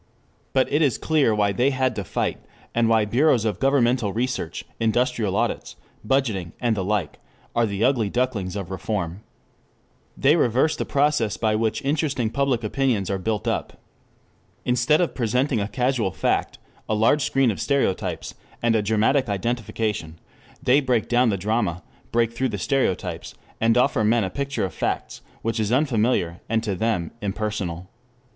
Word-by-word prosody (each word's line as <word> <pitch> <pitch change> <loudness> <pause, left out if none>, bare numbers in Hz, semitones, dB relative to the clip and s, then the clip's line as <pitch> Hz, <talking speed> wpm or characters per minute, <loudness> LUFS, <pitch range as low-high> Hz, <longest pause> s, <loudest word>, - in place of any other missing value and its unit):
But 130 -1 +3
it 150 - +3
is 140 -6 +2
clear 145 -9 +2
why 100 -1 +2
they 125 +8 +2
had 130 -3 0
to 100 - -3
fight, - - -2 0.3
and 115 -1 +2
why 110 -2 +4
bureaus 120 +1 +3
of 105 -3 -1
governmental 125 -5 +2
research, 115 -7 -3
industrial 115 -2 +1
audits, - - -1 0.3
budgeting 105 -9 0
and 120 -3 +1
the 95 - -2
like 95 -5 -2 0.4
are 120 -1 +3
the 100 +1 -2
ugly 120 -5 +2
ducklings 110 -6 -1
of 100 -4 -5
reform. 95 -2 -3 1.0
They 145 +4 +4
reverse 130 +1 +2
the - - -3
process 140 -6 +1
by 110 -2 +1
which 110 0 -1
interesting 140 -5 0
public 135 -4 0
opinions 110 -4 0
are 95 - -1
built 105 +2 -2
up. - - -2 0.9
Instead 125 +6 +3
of 175 - 0
presenting 125 +1 0
a 100 - -1
casual 125 -1 0
fact, - - -1 0.3
a 110 - +2
large 115 +7 +3
screen 135 -3 +2
of 100 - -5
stereotypes, 140 -9 -1 0.3
and 115 -1 +2
a 110 - +3
dramatic 110 +5 +2
identification, 105 -4 -2 0.5
they 135 +2 +4
break 125 -5 0
down 120 0 +4
the 100 - 0
drama, 95 -3 -1 0.3
break 115 0 +1
through 130 +2 -1
the 105 - -3
stereotypes, 130 -3 -1 0.2
and 115 +1 +3
offer 125 -3 +3
men 110 +1 +3
a 95 - -3
picture 140 -3 -2
of 90 - -6
facts, - - -3 0.2
which 115 0 -1
is 110 0 0
unfamiliar 120 - +1
and 115 0 +1
to 105 -3 -1
them 95 -4 -1
impersonal. 100 -4 -3
115 Hz, 165 wpm, -23 LUFS, 105-130 Hz, 1.0 s, why